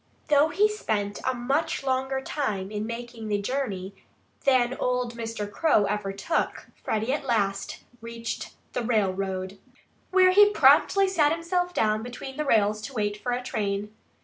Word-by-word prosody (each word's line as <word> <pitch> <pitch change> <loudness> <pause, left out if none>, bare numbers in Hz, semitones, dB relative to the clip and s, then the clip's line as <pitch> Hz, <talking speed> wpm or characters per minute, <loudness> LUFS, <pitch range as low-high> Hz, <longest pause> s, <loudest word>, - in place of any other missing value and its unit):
Though 295 +1 +5
he 400 +6 +3
spent 210 - -2
a 260 - +1
much 280 +6 -1
longer 265 0 -1
time 210 -10 -3
in 210 0 -3
making 235 -1 -6
the 205 -1 0
journey 200 -5 -3 0.5
than 255 -2 +3
old 250 -1 0
Mr. 225 -3 -4
Crow 220 -6 +3
ever 200 -1 -2
took, 200 +12 -2
Freddie 220 +4 -2
at 295 - -2
last 200 -6 -1 0.2
reached 230 0 -6 0.2
the - - -1
railroad, 195 -4 -1 0.5
where 370 -1 +5
he 410 +2 +7
promptly 395 -1 +5
sat 315 -6 +3
himself 355 +2 -1
down 215 -9 +1
between 245 +3 -7
the 300 - -1
rails 215 -4 +2
to 270 +6 -7
wait 205 -2 0
for 245 - -2
a 245 +1 -2
train. 205 -2 -3
240 Hz, 155 wpm, -26 LUFS, 210-280 Hz, 0.5 s, he